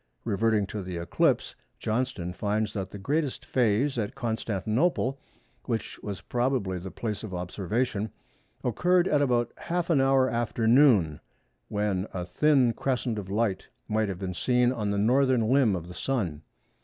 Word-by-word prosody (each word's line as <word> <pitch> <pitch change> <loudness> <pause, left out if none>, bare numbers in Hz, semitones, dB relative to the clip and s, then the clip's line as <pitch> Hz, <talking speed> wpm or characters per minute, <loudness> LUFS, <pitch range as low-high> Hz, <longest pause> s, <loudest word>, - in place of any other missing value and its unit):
Reverting 110 0 +2
to 105 +1 -5
the 90 -2 -5
eclipse—Johnston 105 +3 -1
finds 105 +2 -1
that 95 -3 -3
the 100 - -8
greatest 140 +7 -1
phase 125 +2 +1
at 105 -2 -3
Constantinople, 120 - 0 0.5
which 115 -3 -3
was 100 -2 -5
probably 120 -7 -1
the 95 +2 -7
place 105 +2 -4
of 100 -4 -5
observation, 100 +5 -2 0.5
occurred 180 - +2
at 145 -1 +2
about 120 -4 +1
half 175 0 -2
an 145 -5 +4
hour 135 -1 +4
after 115 -1 -1
noon, 115 - +5 0.5
when 105 -2 -1
a 90 -1 -3
thin 130 +5 +3
crescent 125 -4 -1
of 95 -2 -8
light 100 -2 0 0.2
might 110 -1 0
have 95 - -4
been 95 -1 -4
seen 125 +7 +2
on 110 -5 -2
the 100 - 0
northern 125 +1 +3
limb 130 -7 +4
of 85 -1 -5
the 90 - -9
Sun. 90 - -2
110 Hz, 155 wpm, -27 LUFS, 100-130 Hz, 0.5 s, noon